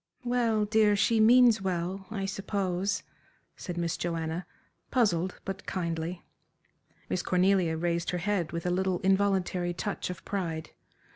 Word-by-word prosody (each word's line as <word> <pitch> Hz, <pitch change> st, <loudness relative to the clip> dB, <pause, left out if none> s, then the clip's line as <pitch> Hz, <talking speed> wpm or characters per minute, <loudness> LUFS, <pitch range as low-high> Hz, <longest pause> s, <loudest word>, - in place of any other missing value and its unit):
"Well, 235 Hz, -3 st, +1 dB
dear, 210 Hz, -1 st, +4 dB
she 225 Hz, +2 st, +3 dB
means 235 Hz, -1 st, +6 dB
well, 185 Hz, +1 st, -2 dB
I 200 Hz, -3 st, -3 dB
suppose," 195 Hz, -1 st, -1 dB, 0.5 s
said 180 Hz, -2 st, -6 dB
Miss 170 Hz, -1 st, -1 dB
Joanna, 165 Hz, 0 st, -3 dB, 0.4 s
puzzled 190 Hz, -7 st, +1 dB
but 195 Hz, 0 st, -6 dB
kindly. 170 Hz, -1 st, -3 dB, 0.8 s
Miss 180 Hz, -, -1 dB
Cornelia 180 Hz, -3 st, +2 dB
raised 170 Hz, +1 st, -1 dB
her 180 Hz, -, -1 dB
head 180 Hz, -2 st, -1 dB
with 170 Hz, 0 st, -4 dB
a 180 Hz, -, +1 dB
little, 185 Hz, 0 st, +1 dB
involuntary 190 Hz, -2 st, +1 dB
touch 205 Hz, +2 st, -3 dB
of 180 Hz, 0 st, -7 dB
pride. 165 Hz, -5 st, -3 dB
185 Hz, 135 wpm, -29 LUFS, 175-205 Hz, 0.8 s, means